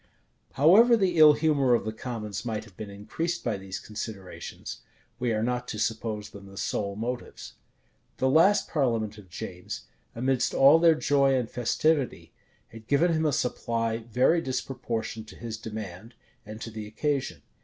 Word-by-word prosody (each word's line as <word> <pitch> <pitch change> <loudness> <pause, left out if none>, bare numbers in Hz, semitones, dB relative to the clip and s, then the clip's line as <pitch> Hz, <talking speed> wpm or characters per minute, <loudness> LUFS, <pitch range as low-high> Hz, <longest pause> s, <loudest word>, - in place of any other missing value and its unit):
However 215 - +6
the 185 -5 +1
ill 155 -1 +9
humor 145 -5 +3
of 115 - -2
the 110 - -3
commons 110 -3 -5
might 110 -3 -3
have 100 -4 -18
been 105 +2 -7
increased 160 +13 -4
by 115 -4 -1
these 95 -1 -6
considerations, 105 -3 -7 0.4
we 120 -1 0
are 110 0 0
not 125 +1 -1
to 110 - -5
suppose 110 -1 -2
them 100 -1 -11
the 95 0 -13
sole 100 0 -2
motives. 120 +3 -5 0.6
The 130 - +1
last 165 +9 +4
parliament 115 -8 0
of 95 -3 -15
James, 90 -1 -7 0.3
amidst 125 +1 0
all 140 +4 +7
their 165 -1 +6
joy 140 -3 +3
and 125 -3 0
festivity, 140 +4 0 0.4
had 115 -1 -13
given 165 +6 +3
him 160 0 +1
a - - +2
supply 115 -4 -1
very 125 +9 +2
disproportioned 120 -4 -4
to - - -12
his 115 -1 -6
demand, 110 0 -7 0.3
and 110 0 -8
to 115 - -6
the 110 -1 -6
occasion. 130 - -2
120 Hz, 165 wpm, -27 LUFS, 110-140 Hz, 0.6 s, ill